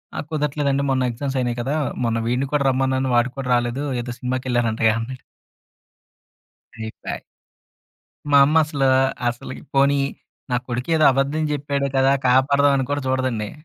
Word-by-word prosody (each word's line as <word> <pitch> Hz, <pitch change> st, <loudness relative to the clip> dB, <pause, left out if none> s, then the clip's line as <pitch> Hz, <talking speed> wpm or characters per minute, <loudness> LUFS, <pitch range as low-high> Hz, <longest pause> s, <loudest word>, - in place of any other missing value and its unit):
నాకు -, -, -5 dB
కుదరట్లేదండి. 145 Hz, -2 st, 0 dB
"మొన్న 130 Hz, -1 st, +1 dB
ఎగ్జామ్స్ 135 Hz, +3 st, -4 dB
అయినాయి 120 Hz, -1 st, -1 dB
కదా! 135 Hz, +5 st, -2 dB, 0.3 s
మొన్న 115 Hz, 0 st, 0 dB
వీడిని 125 Hz, +3 st, 0 dB
కూడా 145 Hz, -1 st, +2 dB
రమ్మన్నాను, 130 Hz, 0 st, 0 dB
వాడు 120 Hz, +1 st, +2 dB
కూడా 130 Hz, -2 st, -4 dB
రాలేదు. 120 Hz, +3 st, -1 dB, 0.2 s
ఏదో 120 Hz, 0 st, -6 dB
సినిమాకెళ్లారంటగా" 120 Hz, -3 st, 0 dB
అన్నాడు. 130 Hz, +3 st, -7 dB, 1.6 s
అయిపాయ్. 110 Hz, -1 st, -6 dB, 1.1 s
మా 140 Hz, -, +7 dB
అమ్మ 155 Hz, +3 st, +2 dB
అసల 150 Hz, -3 st, -3 dB, 0.5 s
అసలకి 120 Hz, +2 st, -7 dB
పోనీ, 140 Hz, +1 st, +4 dB, 0.6 s
నా -, -, +2 dB
కొడుకెదో 140 Hz, +6 st, +1 dB
అబద్ధం 140 Hz, +4 st, 0 dB
జెప్పాడు 140 Hz, -1 st, -1 dB
కదా! 135 Hz, +1 st, +4 dB, 0.2 s
కాపాడదామని 140 Hz, +1 st, +3 dB
కూడా 145 Hz, 0 st, -1 dB
చూడదండి. 130 Hz, -5 st, -1 dB
130 Hz, 130 wpm, -21 LUFS, 120-140 Hz, 1.6 s, మా